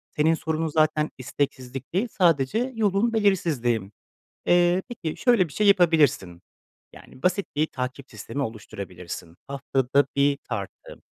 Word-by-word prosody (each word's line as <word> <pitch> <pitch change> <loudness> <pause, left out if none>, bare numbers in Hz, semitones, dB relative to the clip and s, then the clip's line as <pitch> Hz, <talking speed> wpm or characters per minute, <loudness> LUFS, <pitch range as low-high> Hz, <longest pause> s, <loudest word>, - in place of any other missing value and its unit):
Senin 155 +2 +3
sorunun 160 0 -2
zaten 155 0 +2
isteksizlik 130 0 -4
değil, 200 +7 +1
sadece 180 - +2
yolun 215 +1 +1
belirsizliği. 145 - +1 0.6
Eee, 175 +1 +4
peki, 165 -10 -5
şöyle 235 -9 +3
bir 140 - -14
şey 210 - +1
yapabilirsin, 155 - +3 0.5
yani, 130 - -15
basit 185 +2 +1
bir 155 - +2
takip 130 0 -6
sistemi 140 - -5
oluşturabilirsin, 90 -6 -7
haftada 135 0 +1
bir 140 0 +3
tartı, 100 -5 -7
150 Hz, 125 wpm, -25 LUFS, 130-180 Hz, 0.6 s, Eee